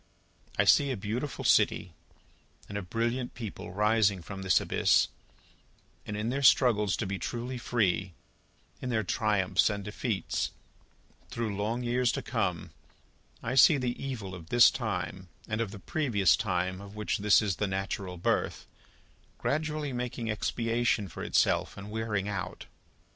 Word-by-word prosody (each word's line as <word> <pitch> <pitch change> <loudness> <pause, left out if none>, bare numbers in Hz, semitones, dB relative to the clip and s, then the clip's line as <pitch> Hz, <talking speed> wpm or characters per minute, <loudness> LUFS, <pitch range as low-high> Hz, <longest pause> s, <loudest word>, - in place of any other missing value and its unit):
I - - +4
see 140 - +5
a 130 - -2
beautiful 115 +8 -4
city 90 - +3 0.7
and 100 - -8
a 100 - -1
brilliant 115 +6 -2
people 105 -4 -7
rising 105 -2 +2
from 95 +2 -7
this 95 -1 +4
abyss, - - +3 1.0
and, 105 - -4
in 110 +2 -1
their 135 +3 -1
struggles 115 -7 +4
to - - -2
be 95 0 -3
truly 125 +1 -4
free, 100 -6 0 0.7
in 125 - -3
their 110 -3 +1
triumphs 105 -1 +2
and 100 -1 -3
defeats, 105 0 -2 0.8
through 115 -3 -3
long 110 +5 -2
years 120 0 +2
to - - -3
come, 100 -8 -2 0.7
I 120 - -2
see 140 +3 +7
the 125 -1 -3
evil 110 -9 -5
of 85 -3 -10
this 120 0 +7
time 95 -2 -4 0.2
and 110 +1 -1
of 115 - -1
the 105 - -9
previous 105 - +2
time 90 +1 -1
of 100 +1 -11
which 105 -1 -2
this 105 0 +5
is 105 -4 -1
the 105 - 0
natural 95 -1 -3
birth, 85 - -1 0.7
gradually 150 -1 -2
making 120 -2 -3
expiation 115 -1 0
for - - -7
itself - - +1
and 100 +1 -8
wearing 110 -3 -2
out. 95 -3 -5
105 Hz, 150 wpm, -29 LUFS, 95-120 Hz, 1.0 s, see